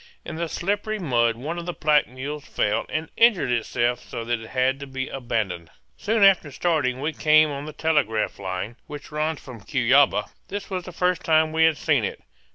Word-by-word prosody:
In 165 - -6
the 165 0 -3
slippery 205 +5 -2
mud 120 - +1
one 155 +9 -5
of 170 - -8
the 175 - -3
pack 150 -1 +3
mules 140 +4 -6
fell 105 +1 0
and 160 +1 -3
injured 225 - +4
itself 120 +1 0
so 115 - -7
that 120 0 -1
it 110 - -10
had 130 +1 +1
to 140 - -7
be 130 -1 -4
abandoned. 105 -10 -3 0.3
Soon 220 0 +1
after 190 -7 +5
starting 135 -5 0
we 155 +2 -1
came 155 +1 +4
on 140 0 -5
the - - -5
telegraph 150 -11 0
line, 95 +4 -4
which 145 0 -9
runs 155 0 -1
from 125 -5 -11
Cuyaba. 130 -1 +3 0.2
This 200 0 -6
was 185 -2 -3
the 185 - -7
first 180 +1 0
time 160 -1 +3
we 160 0 +4
had 160 -2 +3
seen - - +1
it. - - -4
145 Hz, 200 wpm, -24 LUFS, 120-160 Hz, 0.3 s, after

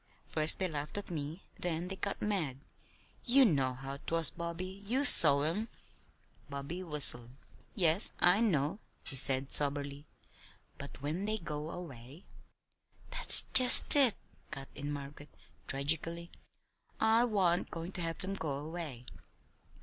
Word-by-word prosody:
First 155 0 +1
they 190 - -3
laughed 150 +1 -8
at 205 - -8
me, 155 +2 -8 0.2
then 175 0 -5
they 195 - -7
got 200 +1 -6
mad. 155 -10 -5 0.6
You 260 +2 +2
know 135 - -1
how 135 +2 -9
'twas, 165 +2 0
Bobby. 180 +3 -9
You 265 +6 0
saw 145 - +9
'em." 185 +9 -4 0.8
Bobby 140 +6 -8
whistled. 145 -8 +2 0.5
"Yes, 175 0 +1
I 180 +5 +2
know," 170 -3 -2 0.3
he - - -8
said 135 0 0
soberly. 145 0 -1 0.7
"But 140 0 -12
when 160 +7 -5
they 215 +1 -3
go 150 -4 -8
away 145 -3 -12 0.4
" - - -32
"That's - - +8
just 255 +2 +7
it," 265 -6 +3 0.3
cut 135 0 -10
in 145 +1 -8
Margaret, 145 0 -11 0.4
tragically. 165 +5 -5 0.7
"I 225 +2 +1
wa'n't 190 -6 -2
goin' 165 +2 -9
to 185 - -8
have 165 -1 -5
them 190 +1 -7
go 155 -7 -6
away. 150 -5 -9
165 Hz, 140 wpm, -30 LUFS, 140-190 Hz, 0.8 s, saw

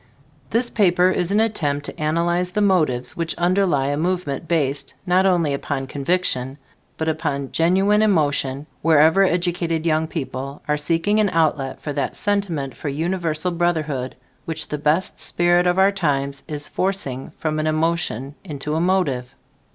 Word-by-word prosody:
This 240 +2 0
paper 180 -3 +3
is 180 0 -1
an 205 - +3
attempt 150 -11 0
to - - -7
analyze 170 +3 0
the 210 - 0
motives 155 -12 +1
which 165 -1 -2
underlie 175 -6 +2
a 145 - -1
movement 165 -3 -2
based, 140 -4 -1
not 185 +2 +3
only 170 -6 +2
upon 140 -1 -3
conviction, 135 -2 -1 0.4
but 160 - -2
upon 145 -4 -2
genuine 195 +5 +3
emotion, 145 -8 +1 0.2
wherever 160 +3 +5
educated 175 -2 0
young 160 -1 +1
people 140 -3 -5
are 150 - +2
seeking 165 +8 +1
an 210 -2 +3
outlet 155 -6 0
for 145 - -5
that 140 - -2
sentiment 180 -10 -1
for 150 - -4
universal 165 +2 -1
brotherhood, 155 -7 -1 0.3
which 165 - -3
the 150 - -3
best 155 +5 0
spirit 175 +1 +2
of 180 +1 +2
our 190 +1 +5
times 140 -7 -1
is 150 -1 -5
forcing 185 -9 -2
from 155 -1 -2
an 155 - 0
emotion 155 -5 -1
into 150 -4 -5
a 160 - +1
motive. 150 -10 0
160 Hz, 155 wpm, -21 LUFS, 145-180 Hz, 0.4 s, wherever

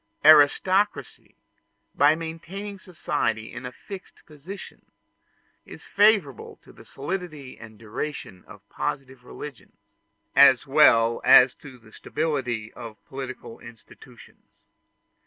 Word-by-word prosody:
Aristocracy, 155 - +3 0.6
by 145 +2 +4
maintaining 175 +5 -8
society 115 - -3
in 125 0 -7
a - - -8
fixed 195 +8 -12
position, 160 +6 -12 0.8
is - - -13
favorable 200 - +1
to - - -18
the - - -17
solidity 150 -3 -7
and 110 -1 -13
duration 110 -3 -7
of - - -16
positive 130 -2 -5
religions, 135 +1 -11 0.6
as - - +6
well 115 0 +4
as 125 0 +7
to 130 -3 -14
the 115 -2 -20
stability 125 -8 -3
of 115 -3 -10
political 130 -3 -9
institutions. 115 -1 -17
140 Hz, 105 wpm, -24 LUFS, 120-165 Hz, 0.8 s, as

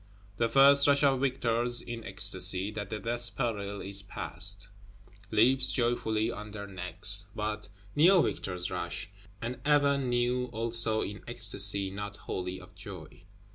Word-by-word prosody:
The 115 0 0
first 140 +2 +6
rush 140 0 +3
of 135 -2 +3
victors, 120 -2 0
in 120 -1 -7
ecstasy 95 -1 +2
that 105 -2 -6
the 110 - -4
death 120 +2 -5
peril 100 -5 -3
is 100 0 -6
passed, 100 0 -7 0.6
"leaps 130 +5 +3
joyfully 115 -2 -1
on 105 -2 -8
their 100 -1 -8
necks"; 100 +2 -3
but 105 0 -4 0.3
new 175 +4 +5
victors 90 -1 -3
rush, 95 - -5 0.3
and 120 +2 -5
ever 145 -1 +2
new, 125 -1 -1
also 115 -1 +1
in 105 +2 -7
ecstasy 100 -4 +6
not 100 +1 -7
wholly 90 -2 -6
of 90 0 -16
joy. 90 -3 -11
110 Hz, 140 wpm, -29 LUFS, 100-120 Hz, 0.6 s, first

